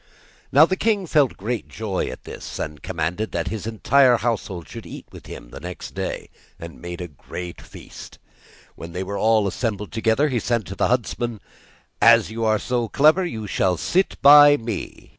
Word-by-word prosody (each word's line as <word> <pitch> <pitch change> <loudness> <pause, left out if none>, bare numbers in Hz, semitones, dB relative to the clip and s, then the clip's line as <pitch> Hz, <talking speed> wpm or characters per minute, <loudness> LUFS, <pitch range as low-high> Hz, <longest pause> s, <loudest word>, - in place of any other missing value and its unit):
Now 145 +4 +7
the 185 - -1
king 210 -1 0
felt 150 -6 +2
great 115 +4 -4
joy 105 -4 -3
at - - -8
this, - - -8
and 75 -1 -5
commanded 90 +4 -3
that - - -2
his 110 -1 -5
entire 125 +3 +4
household 100 -7 -3
should - - -10
eat - - -9
with - - -13
him - - -10
next 90 +1 -8
day, - - -5 0.3
and 85 0 -10
made 85 0 -7
a 90 - -5
great 85 +4 -9
feast. - - -12 0.6
When 85 0 -10
they 90 +2 -3
were 100 +2 -5
all 110 -1 +3
assembled 105 0 -3
together, 115 +6 +1
he 125 -3 0
said 115 -1 -1
to 95 +3 -7
the - - +1
huntsman: 120 -2 -2 0.6
'As 115 -2 +5
you 115 +1 -4
are 110 -1 +3
so 120 +2 -2
clever, 155 - +4
you 110 -12 -5
shall 95 -2 0
sit 185 - 0
by 145 0 +9
me. 115 -4 -6
110 Hz, 180 wpm, -22 LUFS, 95-125 Hz, 0.6 s, by